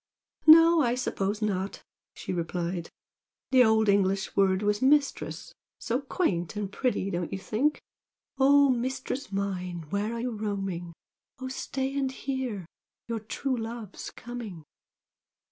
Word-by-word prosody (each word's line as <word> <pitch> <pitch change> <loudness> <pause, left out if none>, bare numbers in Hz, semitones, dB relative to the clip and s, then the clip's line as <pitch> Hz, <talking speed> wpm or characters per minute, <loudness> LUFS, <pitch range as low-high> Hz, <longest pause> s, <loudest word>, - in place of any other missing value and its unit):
"No, 330 +1 +9
I 240 -3 +2
suppose 210 -4 -2
not!" 195 -2 -2 0.3
she - - -5
replied 170 0 -3 0.6
"The 260 -1 +7
old 220 -1 +4
English 195 -1 +2
word 190 0 +3
was 205 0 +1
'Mistress.' 280 +2 +1 0.2
So 235 +3 -1
quaint 205 - -1
and 205 -2 -3
pretty, 235 -7 -1
don't 175 -1 -2
you - - -2
think?" 240 +10 0 0.6
'Oh 280 +1 +6
mistress 255 +2 -3
mine, 180 -4 -3
where 210 +3 -1
are - - -3
you 250 +1 -2
roaming? 195 -5 -3 0.4
Oh 260 -1 -5
stay 265 +1 -3
and 270 -2 0
hear! 260 -8 -3 0.4
your 230 -1 -2
true 260 +5 -2
love's 225 -3 -6
coming!' 225 -9 -8
220 Hz, 130 wpm, -28 LUFS, 195-260 Hz, 0.6 s, No